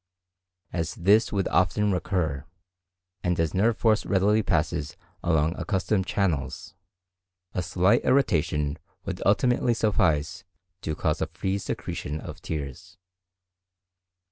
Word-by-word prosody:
As 85 0 -2
this 105 +6 +4
would 100 -2 0
often 100 +3 +2
recur, 85 -7 -1 0.8
and 90 -1 0
as 80 -2 +1
nerve 110 +4 +2
force 110 -2 +3
readily 105 +2 +3
passes 75 -5 -1 0.3
along 80 0 +2
accustomed 95 -1 0
channels, 90 -2 -1 0.8
a 90 - -1
slight 95 +6 +3
irritation 75 - +1 0.3
would - - -4
ultimately 120 -1 +3
suffice 80 -9 +1 0.4
to 80 - -3
cause - - -1
a - - 0
free 95 +1 -2
secretion 75 -4 -4
of 80 +3 -9
tears. 85 +2 -6
90 Hz, 115 wpm, -26 LUFS, 80-100 Hz, 0.8 s, this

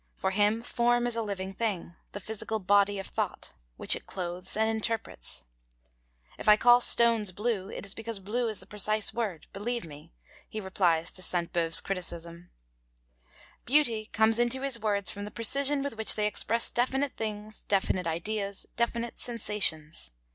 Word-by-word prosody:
For 190 - -2
him 210 +3 +1
form 240 0 +1
is 240 -1 -2
a 230 - -1
living 195 -3 -5
thing, 190 -5 -3 0.2
the 205 - -5
physical 220 +2 -4
body 205 0 +2
of 195 - -5
thought, - - -4 0.2
which - - +4
it - - -10
clothes 180 +1 -4
and 220 0 +2
interprets. 220 - -2 1.0
'If - - 0
I 210 - +8
call 245 +2 +6
stones 230 -5 +6
blue, 205 0 -2
it - - -7
is 195 - -2
because 225 -1 -5
blue 230 +5 -2
is 215 -3 -3
the - - -12
precise 210 +1 0
word, 210 -8 -4
believe 235 +2 -3
me,' 150 -2 -13 0.4
he 215 - -5
replies 180 -4 0
to 185 - -3
Sainte 175 -1 -2
Beuve's 165 -1 +5
criticism. 170 -2 -4 1.1
Beauty 235 -6 +2
comes 220 +1 +3
into 240 +2 +1
his 270 -4 +2
words 205 -3 0
from 205 - -7
the 205 - -6
precision 275 +5 +3
with 280 -4 -4
which 220 - +3
they 210 - 0
express 225 +2 0
definite 265 +3 -1
things, 215 -1 -5
definite 190 -3 0
ideas, 200 +4 -3
definite 235 0 -2
sensations. 200 - -1
210 Hz, 165 wpm, -28 LUFS, 190-230 Hz, 1.1 s, I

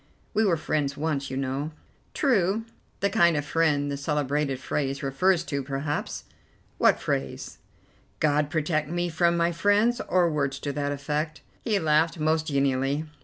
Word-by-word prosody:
We 220 - +3
were 175 -5 +3
friends 145 -2 -1
once, 145 -3 -1
you 130 - -4
know." 135 +2 -2 0.5
"True; 225 - +2 0.4
the 200 - +2
kind 170 -2 +4
of 145 - -2
friend 150 -3 +1
the 140 - -2
celebrated 145 -1 -1
phrase 135 +1 -2
refers 170 +6 +2
to, 140 -4 -3
perhaps." 140 +2 -3 0.6
"What - - +4
phrase?" 65 0 -3 0.6
"'God 150 -1 +2
protect 155 -2 0
me 175 +1 -1
from 170 +1 +2
my 170 0 +2
friends,' 205 +7 +2
or 180 -1 +4
words 140 -4 -1
to 145 - -3
that 145 0 -1
effect." 150 +2 -3 0.2
He 215 -3 +1
laughed 160 -1 +2
most 155 +1 +1
genially. 140 +1 +1
150 Hz, 155 wpm, -26 LUFS, 140-170 Hz, 0.6 s, kind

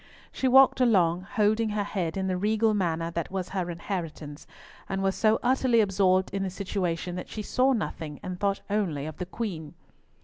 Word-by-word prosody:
She 265 - -1
walked 265 0 +6
along, 185 -6 +3
holding 215 +1 +2
her 210 -1 -1
head 185 -4 -3
in 190 - -1
the 185 -1 0
regal 215 +3 +2
manner 170 -4 -1
that 170 -1 -3
was 190 -1 -4
her 185 -2 -2
inheritance, 165 -4 -6 0.4
and 195 0 -2
was 195 0 +2
so 220 +2 +3
utterly 250 -1 +3
absorbed 190 -2 +2
in 195 - -1
the 195 - -1
situation 180 -2 -3
that 180 - -7
she 215 - -5
saw 255 +5 +2
nothing, 155 - -3
and 180 -1 -5
thought 200 -1 0
only 185 -9 -1
of 155 -1 -7
the 180 - -5
Queen. 180 -8 -5
190 Hz, 190 wpm, -27 LUFS, 170-215 Hz, 0.4 s, walked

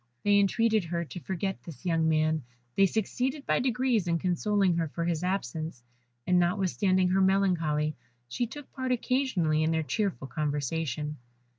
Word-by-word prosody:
They 205 0 +5
entreated 220 0 +2
her 170 0 -2
to 180 - -8
forget 190 +2 -3
this 170 +1 -11
young 165 -2 +2
man; 155 0 +2 0.3
they 195 - +5
succeeded 255 - -2
by - - +2
degrees 250 -5 +1
in 170 -1 +2
consoling 185 +1 +1
her 165 -1 0
for 165 +3 -3
his 170 -1 -1
absence, 160 -6 -3 0.4
and 180 0 +4
notwithstanding 185 +1 +2
her 190 +1 +3
melancholy, 165 -6 +2 0.3
she 240 - -2
took 290 +4 -10
part 260 -2 -3
occasionally 240 - +1
in 155 - +2
their 160 -1 +1
cheerful 190 - -2
conversation. 150 +1 -2
180 Hz, 155 wpm, -29 LUFS, 160-205 Hz, 0.4 s, They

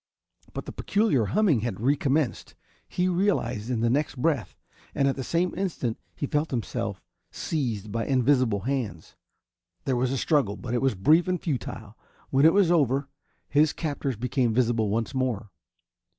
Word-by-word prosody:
But - - -5
the - - -6
peculiar 200 - +1
humming 160 - +3
had 110 -3 -3
recommenced, 140 +2 0 0.3
he 180 0 0
realized 170 - 0
in 120 -3 0
the 120 - +2
next 145 +4 0
breath 130 - 0 0.4
and 135 - +2
at 135 - +1
the 135 - -4
same 170 +6 0
instant 165 - -2 0.2
he - - -2
felt 150 +3 0
himself 120 -5 -3 0.3
seized 115 -9 -3
by 115 +2 -2
invisible 130 -5 +2
hands. 115 -9 -3 0.7
There 130 - +1
was 125 +1 +1
a 135 - -1
struggle, 130 -9 +1
but 120 - -5
it 120 - +1
was 135 -5 +2
brief 155 - +4
and 180 -1 0
futile. 115 - -4 0.4
When 140 +3 +6
it 165 - +5
was 195 -4 +4
over 140 -4 +2 0.4
his 150 +1 +3
captors 140 -5 -3
became 125 0 0
visible 115 -3 +2
once 115 +4 -1
more. 120 -6 -2
130 Hz, 165 wpm, -26 LUFS, 115-150 Hz, 0.7 s, When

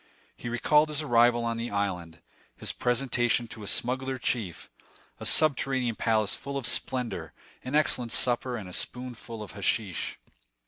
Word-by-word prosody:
He 120 - -7
recalled 150 +6 +3
his 150 0 -1
arrival 120 -3 +3
on 115 0 -2
the 115 +1 -4
island, 90 -5 -3 0.4
his - - -2
presentation 120 -1 0
to 110 - -9
a 105 - -8
smuggler 130 +4 +1
chief, 115 -8 -3 0.5
a - - 0
subterranean 135 -5 +3
palace 110 -2 +1
full 140 0 -5
of 135 - -3
splendor, 125 -1 +1 0.3
an 130 +3 -4
excellent 125 -6 +1
supper, 120 0 +2
and 100 -4 -7
a 90 - -10
spoonful 120 -2 -4
of 100 - -10
hashish. 100 0 -2
120 Hz, 150 wpm, -27 LUFS, 110-130 Hz, 0.5 s, recalled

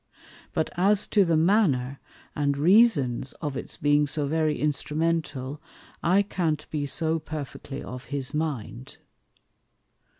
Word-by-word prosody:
But 160 - -1
as 200 +3 +3
to 205 - +4
the 165 -3 +2
manner, 155 - +2 0.4
and 140 -1 0
reasons 150 - +3
of 145 -4 -5
its - - -6
being 145 0 +3
so 145 +1 -1
very 155 +1 0
instrumental, 150 -2 -1 0.4
I 190 +4 +3
can't 160 -6 -2
be 145 -2 -2
so 160 +3 +1
perfectly 145 -2 -7
of 125 0 -8
his 140 -1 -4
mind. 130 -6 -4
150 Hz, 125 wpm, -26 LUFS, 140-165 Hz, 0.4 s, to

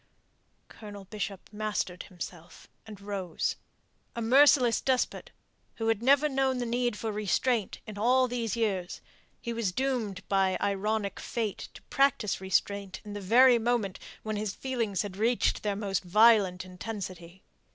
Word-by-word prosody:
Colonel 205 -2 -10
Bishop 200 -1 -5
mastered 210 -4 -2
himself, 175 -2 -10 0.2
and 210 -3 -10
rose. 200 -4 -3 0.6
A - - -3
merciless 255 0 +5
despot, 260 -2 0 0.5
who 225 0 -1
had 225 -1 +1
never 280 +4 +4
known 270 -2 0
the 245 - -2
need 240 -1 -1
for 220 0 -3
restraint 215 +2 0
in 210 -2 -8
all 255 +3 +4
these 235 -3 -2
years, 195 -6 -1 0.4
he 235 - -4
was 230 -5 -1
doomed 225 -5 -2
by 195 -1 +2
ironic 200 0 -1
fate 220 -4 -4
to - - -13
practise 265 -8 +1
restraint 190 +1 -1
in 205 - -7
the 205 - -5
very 240 +5 +6
moment 225 -5 -1 0.2
when 215 -1 -3
his 210 -1 -3
feelings 230 -8 -2
had 195 -2 -7
reached 230 +3 +1
their 205 -1 -1
most 195 -2 -2
violent 195 -1 +4
intensity. 185 -2 -7
210 Hz, 145 wpm, -29 LUFS, 195-235 Hz, 0.6 s, very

